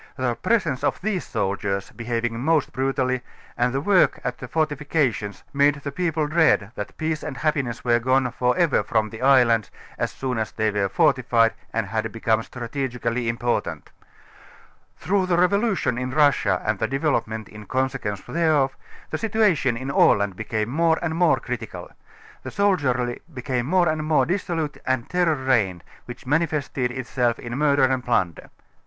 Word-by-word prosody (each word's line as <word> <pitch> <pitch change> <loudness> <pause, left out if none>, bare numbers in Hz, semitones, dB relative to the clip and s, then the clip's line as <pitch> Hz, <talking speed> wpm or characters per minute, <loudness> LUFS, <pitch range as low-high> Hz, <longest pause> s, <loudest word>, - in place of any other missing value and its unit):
The 130 -2 0
presence 165 - 0
of - - 0
these 195 -2 -2
soldiei┬╗s, 100 -2 -2
be 120 - -8
having 115 -1 -1
most 155 +2 +1
brutallj^ 130 -1 0 0.3
and 125 +1 +1
the 135 - -1
work 190 +3 +3
at 125 0 -3
the 125 - -7
fortifications, 145 - -1
made 145 +1 +4
the 140 -1 -6
people 160 -1 -1
dread, 155 -10 +3
that 105 - -7
peace 155 -1 -2
and 150 -3 -6
happiness 140 -7 -1
were 120 -1 +3
gone 130 +1 +1
for 125 +4 0
ever 170 -6 +3
from 110 -2 0
the 110 - -9
islands 125 -5 +4 0.3
as - - 0
soon 130 -3 -3
as 110 - -2
they 110 -1 0
were 100 -1 0
fortified 125 - +3 0.2
and 115 -2 -1
had 110 +2 -2
become 115 0 +1
strategically 120 -1 -3
important. 120 +1 -2 1.1
Through 190 -1 0
the 175 -2 +2
revolution 195 - +1
in 125 0 -3
Russia 135 -10 +2
and 105 -2 0
the 110 - 0
developement 125 -6 -1
in 105 -1 -12
consequence 130 -6 -2
thereof, 155 -5 +1 0.4
the - - -2
situation 200 - +2
in 130 +3 -4
Aland 100 -7 +3
became 110 +1 -2
more 160 +4 +2
and 165 -2 -1
more 170 -2 +3
critical. 125 -3 -6 0.5
The - - -6
soldiery 135 -12 0
became 125 -2 -3
more 180 +2 +3
and 155 0 0
more 155 0 +3
dis 185 +3 -1
solute 160 -4 -3
and 130 -2 0
a - - -26
terror 175 -3 +2
reigned, 110 - 0 0.2
which 120 - -10
manifested 145 -3 0
itself 125 -1 -1
in 120 0 -6
mur 145 0 +3
der 140 - +3
and 130 -1 +2
plunder. 95 -9 -1
130 Hz, 170 wpm, -23 LUFS, 115-155 Hz, 1.1 s, made